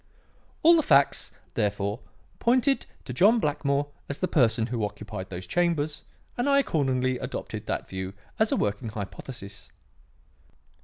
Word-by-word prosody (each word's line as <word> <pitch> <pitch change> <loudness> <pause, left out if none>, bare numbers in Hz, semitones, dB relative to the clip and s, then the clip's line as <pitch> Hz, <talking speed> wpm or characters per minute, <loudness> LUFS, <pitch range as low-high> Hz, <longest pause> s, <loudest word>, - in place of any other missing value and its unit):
"All 335 +2 +8
the - - +4
facts, 140 - +3 0.2
therefore, 100 +1 -1 0.4
pointed 255 +3 +2 0.2
to 125 - -5
John 210 - +5
Blackmore 145 -3 0 0.2
as 145 - -3
the 185 - 0
person 115 -8 +3
who 115 -2 -2
occupied 105 -2 -5
these 90 0 -6
chambers, 160 - 0 0.3
and 245 +4 +1
I 280 - +5
accordingly 130 - +1
adopted - - -5
that - - -2
view 95 0 -5 0.2
as 220 0 +3
a - - +3
working 105 +2 -1
hypothesis." 100 0 -8
130 Hz, 140 wpm, -27 LUFS, 105-175 Hz, 0.4 s, All